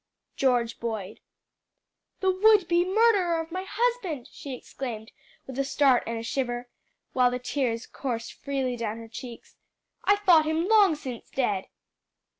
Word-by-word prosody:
"George 245 -3 +1
Boyd." 220 -4 -4 1.0
"The 380 -1 +3
would 405 0 +5
be 345 0 +3
murderer 380 -4 +3
of 325 0 -5
my 370 +2 -4
husband!" 445 - -1
she 275 -3 -7
exclaimed, 230 -4 -7 0.3
with 265 0 -7
a - - +3
start 270 -2 +3
and 230 0 -3
shiver, 245 -1 -2 0.5
while 250 -1 +4
the 250 - -2
tears 250 -2 -2
coursed 235 -4 -4
freely 270 -3 -2
down 225 -2 -3
her 230 0 -9
cheeks. 235 +1 -10 0.5
"I 405 - +5
thought 360 -6 +5
him 320 +3 0
long 410 -6 +5
since 255 -5 -8
dead." 210 -8 -1
270 Hz, 145 wpm, -27 LUFS, 235-350 Hz, 1.0 s, would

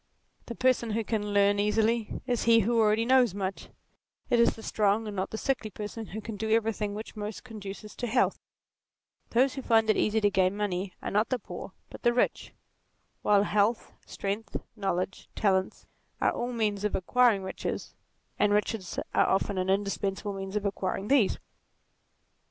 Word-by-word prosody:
The 235 - -5
person 255 -2 +2
who 225 +1 0
can 210 -1 -2
learn 200 0 +3
easily, 220 +2 +1
is 245 -2 -1
he 230 0 +6
who 230 +3 +1
already 220 +1 +3
knows 250 -5 +4
much: 195 -1 -4 0.6
it 240 - +4
is 235 - +4
the 225 - -11
strong 210 +1 +1
and 210 -1 -5
not 190 0 -2
the 220 - -5
sickly 245 -3 -1
person 210 +2 -6
who 220 - -6
can 215 -1 -6
do 220 +2 -3
everything 220 -2 +1
which 215 +2 -7
most 210 0 -5
conduces 210 -3 -8
to 245 - -2
health; 245 +3 +2 0.9
those 255 +3 +3
who 270 - -5
find 225 -3 +4
it - - 0
easy 215 +1 +2
to 205 -1 +2
gain 190 +1 +2
money 195 -2 -2
are - - -3
not 210 +2 +2
the 255 - +1
poor 185 -3 -9 0.2
but - - -10
the 240 - +3
rich; 245 - 0 0.7
while 205 -1 +4
health, 210 +2 +1
strength, 200 +3 -3 0.2
knowledge, 195 -2 -2
talents, 190 -2 0 0.3
are - - +3
all 240 +1 -3
means 210 -4 -1
of 210 - 0
acquiring 230 +1 +3
D - - -7
36 - - -14
NATURE - - 0
riches, - - -9 0.4
and 210 0 +3
riches 210 -2 -1
are - - +4
often 195 0 +1
an 185 0 -1
indispensable 200 +1 -1
means 195 0 -6
of 210 -1 -1
acquiring 195 +1 -2
these. 265 -8 +4
210 Hz, 185 wpm, -28 LUFS, 200-230 Hz, 0.9 s, he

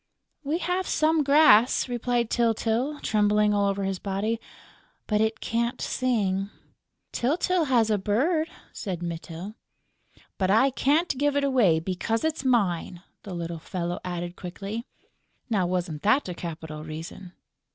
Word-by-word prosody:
"We 300 +3 0
have 360 +1 -1
some 315 0 +2
grass," 275 -6 +5
replied 240 -1 -1
Tyltyl, 235 +4 0
trembling 210 0 +3
all 200 -1 +2
over 200 0 -2
his 195 -1 -2
body, 210 +4 -2 0.6
"but 210 -1 +1
it 220 0 0
can't 235 +2 -1
sing...." 200 -6 0 0.6
"Tyltyl 330 +6 +1
has 235 -4 +3
a 210 - +2
bird," 310 - +1 0.2
said 180 -5 -5
Mytyl. 170 +3 -6 0.9
"But 190 -1 +1
I 245 +7 +4
can't 295 +5 +1
give 290 0 +2
it 285 - +2
away, 240 -12 +3
because 190 - -2
it's 315 -3 -1
mine," 190 -8 0 0.2
the 190 -3 -7
little 170 -1 -4
fellow 175 +1 -4
added, 175 -1 -4
quickly. 200 +7 -6 0.6
Now 190 -5 +2
wasn't 175 -4 -2
that 220 +6 +3
a 180 - -4
capital 160 -3 -7
reason? 160 +4 -8
210 Hz, 140 wpm, -26 LUFS, 180-255 Hz, 0.9 s, grass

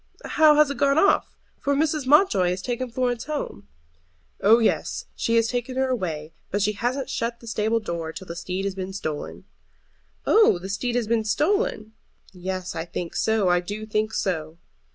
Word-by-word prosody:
"How 310 -1 +5
has 300 -1 +4
it 280 - -6
gone 280 0 +3
off? 400 +5 +3 0.2
For 280 0 0
Mrs. 305 -2 0
Mountjoy 260 - +5
has 180 +1 -3
taken 250 0 -3
Florence 245 0 -1
home." 290 - -5 0.7
"Oh 215 +3 +7
yes, 225 -2 0
she 230 - 0
has 230 -1 +4
taken 245 +2 -3
her 265 0 +1
away. 165 -10 -3 0.2
But 205 +1 0
she 210 - +2
hasn't 245 +5 -2
shut 235 -3 -3
the 235 - -14
stable 220 0 0
door 170 -6 -4
till 160 +4 -9
the 170 - -7
steed 180 +2 -3
has 200 - -1
been 190 0 -5
stolen." 155 -6 -5 0.8
"Oh, 430 - +5
the 185 +2 -8
steed 235 +5 -2
has 245 -2 +1
been 225 0 +1
stolen?" 220 - 0 0.4
"Yes, 185 0 -4
I 160 - -2
think 170 0 -6
so; 220 -4 +2
I 175 0 +4
do 205 +4 -6
think 215 0 -1
so." 160 -6 -2
220 Hz, 185 wpm, -24 LUFS, 185-255 Hz, 0.8 s, Oh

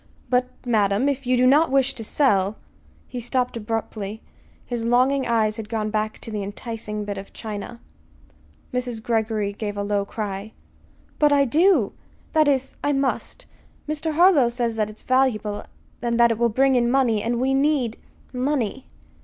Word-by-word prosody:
"But, 250 0 +3 0.2
madam, 210 +1 +2
if 275 -2 -2
you 250 0 +3
do 250 - +4
not 295 +5 +5
wish 270 0 +2
to 230 - -7
sell 210 -5 +2 0.3
" - - -31
He 250 - -6
stopped 250 +1 -1
abruptly. 220 -1 -4 0.4
His 240 -2 -3
longing 255 +3 +2
eyes 220 -2 +1
had 220 -1 -7
gone 215 -2 -2
back 215 0 -1
to 225 - -6
the 210 -1 -3
enticing 210 +1 -5
bit 200 -1 -4
of 195 - -11
china. 220 +2 -6 0.9
Mrs. 250 -2 -2
Greggory 220 -3 0
gave 205 -1 -5
a 200 - -1
low 200 0 0
cry. 205 0 -5 0.7
"But 295 -1 +5
I 280 -1 +4
do 310 - +3 0.4
that 310 -2 +4
is, 270 -2 0
I 290 - +2
must. 275 -1 -2 0.4
Mr. 310 +1 -2
Harlow 320 -7 +5
says 235 -1 -1
that 215 -1 0
it 215 - -10
is - - -11
valuable, 230 -6 +1 0.4
and 235 -1 0
that 235 0 +6
it 225 - -2
will 235 0 +3
bring 265 +4 +3
in 240 -1 +3
money; 245 -5 +2
and 235 +2 -1
we 265 +2 +1
need 270 -5 +1 0.4
money." 260 -1 -1
235 Hz, 175 wpm, -23 LUFS, 215-265 Hz, 0.9 s, that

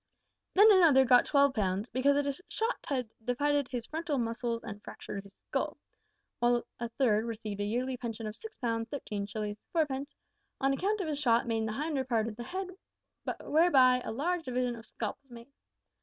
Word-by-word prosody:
"Then 420 +3 +8
another 320 -9 +6
got 245 0 +6
12 280 -1 +4
pounds 200 0 -1
`because 270 +3 +3
a 280 - 0
shot 450 +2 -2
had 250 -5 -2
divided 285 +3 +1
his 245 -3 -4
frontal 320 -2 -2
muscles 230 0 -2
and 210 -3 -7
fractured 200 - -7
his 200 0 -16
skull;' - - -3 0.6
while 240 0 +2
a 235 0 -3
third 230 -3 +2
received 215 -3 -4
a - - 0
yearly 250 +4 -1
pension 230 -2 -5
of 215 0 -5
6 445 -1 -9
pounds, 230 -2 -2
13 210 -8 -4
shillings, 210 0 -4
4 325 -2 +4
pence 275 0 -5 0.4
`on 270 0 +2
account 405 +8 0
of 355 - -3
a 305 - -1
shot 240 -4 +2
in 225 -1 0
the 215 - -3
hinder 290 +1 -1
part 230 -4 0
of 220 - -5
the 240 +1 -7
head, 370 +7 -4 0.7
whereby 270 -6 +5
a - - -4
large 330 +8 -1
division 250 -2 -1
of 225 -1 -12
scalp 220 +2 -4
was 275 - -36
made.' 235 +2 -12
250 Hz, 190 wpm, -31 LUFS, 225-285 Hz, 0.7 s, Then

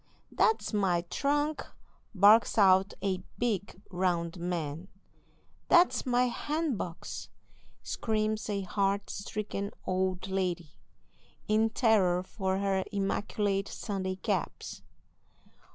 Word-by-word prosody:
"That's 445 - +1
my 190 -4 +2
trunk!" 290 +2 0 0.5
barks 210 +5 +6
out 190 -1 +5
a 190 -2 0 0.2
big, 205 -6 -2
round 175 -1 -1
man. 170 -1 -3 0.8
"That's 345 -5 +4
my 250 0 +3 0.2
bandbox!" 290 - -3 0.5
screams 215 -1 -1
a 200 -1 -1
heart 200 +1 -1
stricken 200 0 -4 0.2
old 185 0 -1
lady, 180 -4 -2 0.8
in 220 +1 +3
terror 195 -7 +3
for 190 -1 -2
her 195 -1 +1
immaculate 200 0 -1
Sunday 190 -3 -3
caps. 185 - -3
195 Hz, 95 wpm, -30 LUFS, 185-215 Hz, 0.8 s, barks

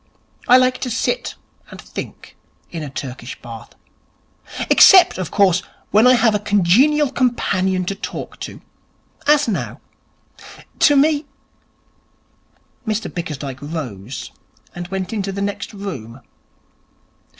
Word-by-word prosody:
I 250 - +8
like 255 0 +2
to 255 - -3
sit 240 - -2 0.3
and - - -11
think - - -9 0.4
in 165 - -5
a 150 - -5
Turkish 130 -2 -7
Bath. 115 -1 -11 0.9
Except, 375 - +7
of 185 - -3
course, 190 -3 +3 0.3
when 215 +4 +5
I 255 - +7
have 225 -2 +3
a 210 - +1
congenial 230 - +3
companion 190 -8 0
to 195 - -2
talk - - -7
to. - - -8 0.7
As 295 -1 +4
now. 215 - -3 1.0
To 290 - +5
me 290 +1 +3 0.8
' 250 - -37
Mr 215 0 -2
Bickersdyke 145 -6 -5
rose, 130 - -6 0.4
and 175 0 -6
went 190 +2 -4
into 200 -2 -2
the 195 - -5
next 200 0 -3
room. 135 - -7
195 Hz, 125 wpm, -19 LUFS, 160-250 Hz, 1.0 s, I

